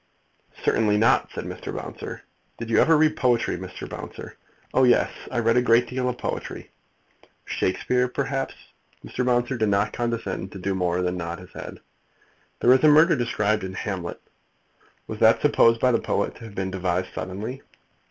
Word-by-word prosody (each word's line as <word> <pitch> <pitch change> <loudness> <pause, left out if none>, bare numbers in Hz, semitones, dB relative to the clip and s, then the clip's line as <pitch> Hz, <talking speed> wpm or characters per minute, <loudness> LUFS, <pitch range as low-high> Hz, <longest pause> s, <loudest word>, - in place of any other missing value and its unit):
"Certainly 105 -2 +3
not," 110 +2 +3
said - - -5
Mr. - - -6
Bouncer. - - -7 0.3
"Did 115 0 -6
you - - +4
ever 160 0 +5
read 155 0 +3
poetry, 120 -2 +1
Mr. 90 0 -8
Bouncer?" - - -8 0.4
"Oh 130 - +4
yes; 125 -1 +4 0.2
I 120 - -4
read 115 0 +3
a - - +5
great 120 0 +4
deal 125 +1 -1
of 125 - -4
poetry." - - -5 0.7
"Shakespeare, 125 +7 0
perhaps?" 135 +1 -3 0.5
Mr. 125 - -3
Bouncer 125 +1 +1
did 110 -2 +1
not 100 +1 +1
condescend 115 -6 -3
to - - -7
do 95 +1 -2
more 90 -1 0
than 90 0 -1
nod 85 0 -4
his 90 0 -13
head. - - -9 0.8
"There 125 - +6
is 130 - +3
a - - +7
murder 155 +3 +6
described 110 -4 0
in 95 0 -5
Hamlet. 95 -3 -4 0.9
Was - - -7
that - - +5
supposed 115 0 +4
by 125 - +3
the 115 - +2
poet - - -1
to 115 - -11
have 105 -3 -11
been 95 0 -2
devised 90 -1 -2
suddenly?" 110 +9 -5
115 Hz, 175 wpm, -24 LUFS, 95-125 Hz, 0.9 s, a